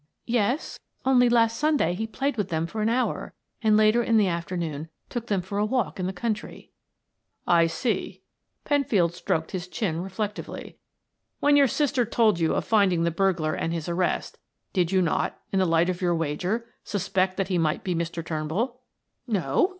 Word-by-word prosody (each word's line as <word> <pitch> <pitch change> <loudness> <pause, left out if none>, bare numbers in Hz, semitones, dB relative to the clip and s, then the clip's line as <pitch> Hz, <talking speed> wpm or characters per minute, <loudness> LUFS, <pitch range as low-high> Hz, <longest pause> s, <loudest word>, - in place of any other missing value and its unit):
"Yes. 240 - 0 0.3
Only 250 -2 +5
last 230 -1 +3
Sunday 300 - +2
he 220 +5 -3
played 270 +5 -2
with 205 -4 -2
them 160 -1 0
for 215 +6 -4
an 215 - +2
hour, 250 +2 -1 0.3
and 215 -2 +4
later 215 +2 +4
in 230 -1 +2
the 210 -2 +4
afternoon 170 -3 -3 0.2
took 235 -1 -4
them 195 -5 0
for 200 +2 -3
a - - +2
walk 240 -5 -1
in 180 - -1
the - - -1
country." 215 +3 -4 0.7
"I 170 -1 +4
see." 225 +8 -2 0.4
Penfield 245 - +2
stroked 160 -2 -2
his 180 -2 -4
chin 175 -4 -2
reflectively. 200 +3 -5 0.6
"When 290 0 +4
your 280 -1 +6
sister 275 0 +1
told 220 -4 +2
you 165 -1 +2
of - - -1
finding 195 -6 +3
the 170 - +1
burglar 170 -3 +1
and 165 - -2
his 165 -1 -4
arrest, 175 +1 -1 0.3
did 180 -3 +1
you 190 -1 +3
not, 165 - -1
in 195 - +1
the 185 - +3
light 165 +1 +3
of 185 0 -2
your 175 -1 +2
wager, 175 +9 -1 0.2
suspect 190 -1 -1
that 195 -1 -1
he 180 -2 +1
might 155 -2 0
be 185 - -1
Mr. 170 0 -3
Turnbull?" 170 +12 -2 0.5
"No." 245 - +1
190 Hz, 180 wpm, -26 LUFS, 170-230 Hz, 0.7 s, your